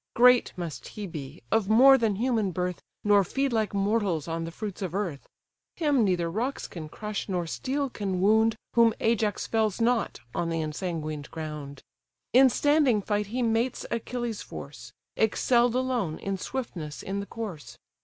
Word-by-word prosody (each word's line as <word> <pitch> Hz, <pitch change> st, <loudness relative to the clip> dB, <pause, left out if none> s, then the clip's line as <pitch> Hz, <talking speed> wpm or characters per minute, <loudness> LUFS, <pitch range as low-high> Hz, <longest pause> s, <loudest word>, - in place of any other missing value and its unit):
Great 250 Hz, 0 st, +6 dB
must 170 Hz, -4 st, -5 dB
he 210 Hz, -, -6 dB
be, 150 Hz, -3 st, -8 dB
of 220 Hz, -3 st, +2 dB
more 260 Hz, +5 st, +8 dB
than 225 Hz, -5 st, +1 dB
human 225 Hz, -2 st, +1 dB
birth, 180 Hz, 0 st, -3 dB, 0.2 s
Nor 205 Hz, -1 st, +5 dB
feed 270 Hz, +6 st, -1 dB
like 220 Hz, -2 st, +1 dB
mortals 200 Hz, -6 st, 0 dB
on 165 Hz, 0 st, -2 dB
the 165 Hz, -, -6 dB
fruits 205 Hz, +2 st, -6 dB
of 185 Hz, -2 st, -3 dB
earth. 175 Hz, -9 st, -3 dB, 0.5 s
Him 290 Hz, -7 st, +2 dB
neither 180 Hz, -4 st, +1 dB
rocks 230 Hz, +11 st, -2 dB
can 155 Hz, -3 st, -8 dB
crush, 210 Hz, +4 st, -5 dB
nor 180 Hz, -2 st, -1 dB
steel 275 Hz, -, -2 dB
can 200 Hz, -7 st, -3 dB
wound, 220 Hz, +3 st, +4 dB, 0.2 s
Whom 230 Hz, -1 st, +5 dB
Ajax 220 Hz, -2 st, +1 dB
fells 220 Hz, -2 st, 0 dB
not 235 Hz, -1 st, +1 dB
on 170 Hz, -, -1 dB
the 165 Hz, 0 st, -1 dB
ensanguined 155 Hz, -2 st, -4 dB
ground. 150 Hz, -3 st, -7 dB, 0.5 s
In 260 Hz, +2 st, +8 dB
standing 285 Hz, -6 st, +3 dB
fight 205 Hz, 0 st, -1 dB
he 245 Hz, +4 st, -2 dB
mates 230 Hz, +2 st, 0 dB
Achilles' 235 Hz, -1 st, -3 dB
force, -, -, -9 dB, 0.2 s
Excell'd 235 Hz, +2 st, +3 dB
alone 250 Hz, -11 st, 0 dB
in 195 Hz, 0 st, -3 dB
swiftness 175 Hz, -, -5 dB
in 195 Hz, +1 st, -3 dB
the 200 Hz, -, -5 dB
course. 175 Hz, -, -7 dB
210 Hz, 165 wpm, -27 LUFS, 175-235 Hz, 0.5 s, more